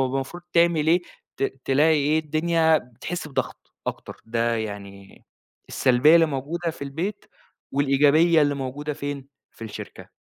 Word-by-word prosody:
المفروض 135 +6 -4
تعمل 170 -3 +3
إيه، 175 +3 +4 0.3
ت - - -5 0.2
تلاقي 150 +4 +3
إيه، 150 +2 +2
الدنيا 160 +1 +2
بتحس 140 +7 -7
بضغط 135 - -5
أكتر، - - -6
ده 115 0 0
يعني 100 -2 -8 0.4
السلبيّة 130 +5 +4
اللي 165 -1 +6
موجودة 160 +4 -3
في 155 - -10
البيت 170 +9 -4 0.5
والإيجابية 145 +4 +4
اللي 145 0 +1
موجودة 140 +2 -4
فين، 140 -1 -6 0.2
في 115 - -11
الشركة، 110 - -9
145 Hz, 135 wpm, -24 LUFS, 130-160 Hz, 0.5 s, اللي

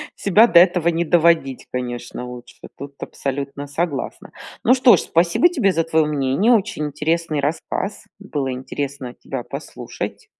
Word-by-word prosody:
Себя 205 +4 +4
до 170 - +7
этого 175 -1 +3
не 170 0 +1
доводить, 160 -5 +2
конечно, 125 0 -5
лучше, 125 0 -11 0.2
тут 140 +1 -9
абсолютно 140 +1 -5
согласна. 145 0 -4 0.3
Ну 245 - +5
что 255 -2 +6
ж, - - -2
спасибо 170 - +3
тебе 205 - +1
за 165 -2 0
твое 160 -1 +2
мнение. 145 - +1
Очень 210 -8 0
интересный 160 +1 -1
рассказ. 160 +8 -3
Было 145 -9 -3
интересно 135 0 -5
тебя 130 -1 -7
послушать. - - -7
155 Hz, 145 wpm, -20 LUFS, 135-175 Hz, 0.3 s, до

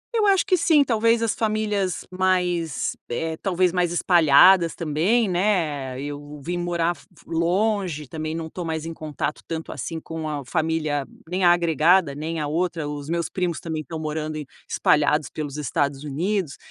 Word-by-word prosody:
Eu 425 -2 +3
acho 390 -1 +4
que 380 -3 +3
sim, 315 -4 +4
talvez 230 -1 +2
as 225 -2 +1
famílias 210 -4 -1
mais 180 -4 0
eh 160 +6 -2
talvez 185 -2 +1
mais 175 -2 +1
espalhadas 170 +1 +5
também, 175 +9 +1
né. 160 -9 0
Eu 145 +1 -7
vim 175 +1 -2
morar 175 -1 0
fo 145 - -18 0.2
longe. 175 - 0
Também 155 +1 -4
não 165 -1 -4
estou 175 +2 -6
mais 160 -1 -3
em 165 - -5
contato 155 -1 -4
tanto 160 -1 -5
assim 165 -1 -5
com 160 -1 -5
a 145 -3 -4
família, 155 -1 0 0.2
nem 185 +2 -2
a 175 - +7
agregada, 170 -1 +3
nem 160 +3 -4
a 150 - -1
outra. 165 -1 -1
Os 145 0 -6
meus 170 -1 0
primos 180 -3 -2
também 160 -2 -4
estão 160 +3 -7
morando 155 0 -3
em 150 -2 -5 0.2
espalhados 150 -1 +2
pelos 150 -2 -5
Estados 140 0 -1
Unidos, 160 +1 -2
165 Hz, 170 wpm, -23 LUFS, 150-185 Hz, 0.2 s, a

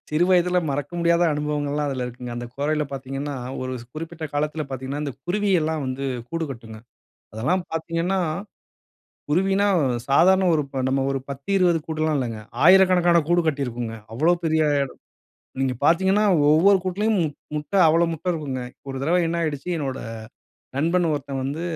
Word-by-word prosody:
சிறு 155 +3 +2
வயதுல 180 0 +4
மறக்க 145 +1 -3
முடியாத 170 0 +3
அனுபவங்கள்லாம் 150 0 -1
அதில 130 -2 -2
இருக்குங்க. 125 0 -7
அந்த 120 - -5
கொறையில 150 +2 0
பார்த்தீங்கன்னா 135 +1 -4 0.3
ஒரு 130 0 -3 0.2
குறிப்பிட்ட 160 +1 -7
காலத்தில 150 +1 -1
பார்த்தீங்கன்னா 135 +2 -4
இந்த 140 - -4
குருவி 205 +3 0
எல்லாம் 155 -1 -1
வந்து 130 +1 -3 0.2
கூடு 165 0 -2
கட்டுங்க. 115 -3 -10 0.6
அதெல்லாம் 170 - 0
பார்த்தீங்கன்னா 165 +3 -1 1.1
குருவின்னா 195 +5 +2 0.4
சாதாரண 185 +7 +5
ஒரு 150 -2 +2 0.2
நம்ம 135 0 +1
ஒரு 135 - -1
10-20 175 +5 +1
கூடுல்லாம் 155 -1 0
இல்லங்க. 115 -5 -3 0.2
1000கணக்கான 180 -1 +6
கூடு 175 +1 +3
கட்டியிருக்குங்க. 120 -6 -2 0.2
அவ்வளவு 170 +8 +2
பெரிய 160 0 +2 0.2
எடம். 140 - +1 0.8
நீங்க 130 -1 +1
பார்த்தீங்கன்னா 190 +5 +3 0.3
ஒவ்வொரு 185 +6 +6
கூட்டிலும் 205 +4 0
முட் 150 -3 -3 0.2
முட்ட 150 +6 -6
அவ்வளவு 165 +2 +3
முட்டை 165 +3 -2
இருக்குங்க. 145 -6 -4 0.3
ஒரு 135 - -5
தடவ 165 +5 +2
என்ன 170 +1 -1
ஆயிடுச்சு 150 0 -3
என்னோட 135 -3 -3 0.8
நண்பன் 170 +3 +2
ஒருத்தன் 140 -2 -3
வந்து 145 +5 -3
155 Hz, 145 wpm, -23 LUFS, 135-175 Hz, 1.1 s, 1000கணக்கான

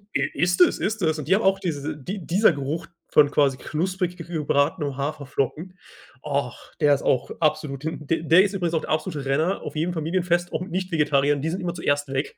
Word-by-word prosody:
I 140 - +2
ist 175 +3 +1
es, - - +5
ist 215 0 -2
es 160 -1 +1
und 150 - -6
die 190 - +5
haben 220 - 0
auch 195 0 +3
diese 155 -4 -3
die 180 +5 -6
dieser 195 +6 +4
Geruch 150 +5 -4 0.2
von 145 -1 +6
quasi 135 -3 +2
knusprig 180 +5 -2
g 165 - -7
gebratenen 150 -2 0
Haferflocken. 145 +5 -3 0.5
Och, 140 -4 -3
der 145 -1 +5
ist - - -6
auch 130 - +1
absolut 150 -3 0
him 160 -2 -4
d 165 -1 0
der 165 +4 +6
ist 200 0 -1
übrigens 175 -3 -1
auch 160 - +1
der - - -8
absolute 155 -3 -2
Renner 155 +8 0
auf - - -7
jedem 170 +3 -1
Familienfest, 175 +2 0
auch 160 - -2
Nicht-Vegetarier, 150 -6 +1
und 140 - -5
die 160 - -1
sind 185 +3 -3
immer 175 -1 -2
zuerst 145 -3 0
weg. 135 +1 -2
160 Hz, 215 wpm, -24 LUFS, 145-180 Hz, 0.5 s, von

